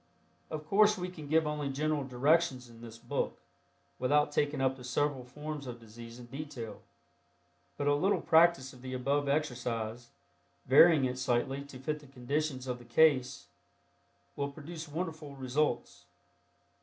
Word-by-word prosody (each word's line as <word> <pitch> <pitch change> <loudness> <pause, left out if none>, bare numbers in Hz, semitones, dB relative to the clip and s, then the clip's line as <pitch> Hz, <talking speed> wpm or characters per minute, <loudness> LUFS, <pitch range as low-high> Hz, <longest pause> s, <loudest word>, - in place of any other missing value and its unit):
Of 155 -1 -5
course 210 +4 +4
we 180 0 -3
can 155 -5 -9
give 160 +2 +3
only 150 -2 -2
general 150 +1 0
directions 135 0 +2
in 115 -1 -15
this 115 -1 -10
book - - -3 0.6
without 145 +3 +3
taking 145 -1 0
up 130 0 +2
the 130 - -12
several 130 +2 0
forms 150 +2 -7
of 120 -1 -7
disease 115 +1 -11
in 125 - -10
detail, 135 -3 -7 1.0
but 145 - -2
a 145 - +4
little 185 +8 +2
practice 160 -5 +4
of 125 - -15
the 130 0 -5
above 140 +3 0
exercise, 120 -5 -2 0.6
varying 145 +2 +7
it 125 0 -2
slightly 130 +2 0
to 140 -2 -11
fit 150 +4 -3
the 145 - -16
conditions 135 +1 -2
of 125 -1 -3
the 120 - -14
case, 130 0 +3 0.9
will 140 0 -2
produce 160 +2 -8
wonderful 155 -2 -5
results. 135 +3 -1
140 Hz, 155 wpm, -31 LUFS, 125-155 Hz, 1.0 s, varying